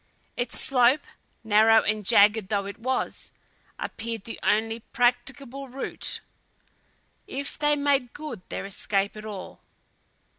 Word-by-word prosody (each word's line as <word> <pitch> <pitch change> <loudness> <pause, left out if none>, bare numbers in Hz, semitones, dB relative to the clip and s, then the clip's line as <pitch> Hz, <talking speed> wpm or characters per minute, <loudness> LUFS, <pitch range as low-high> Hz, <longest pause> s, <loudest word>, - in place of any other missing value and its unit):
Its 240 -1 -2
slope, 260 +2 +4 0.4
narrow 220 +1 +6
and 210 -2 -1
jagged 210 -2 +5
though 200 -2 0
it 200 +2 -7
was, 255 +3 -2 0.5
appeared 225 -2 -5
the 225 - -7
only 225 +2 +1
practicable 255 +3 -1
route, 265 +2 -2 1.1
if 280 +1 -5
they 295 0 +3
made 280 -4 +1
good 295 -10 -7
their - - -4
escape 200 +1 -1
at 215 0 -8
all. 205 -3 -7
230 Hz, 120 wpm, -26 LUFS, 210-265 Hz, 1.1 s, narrow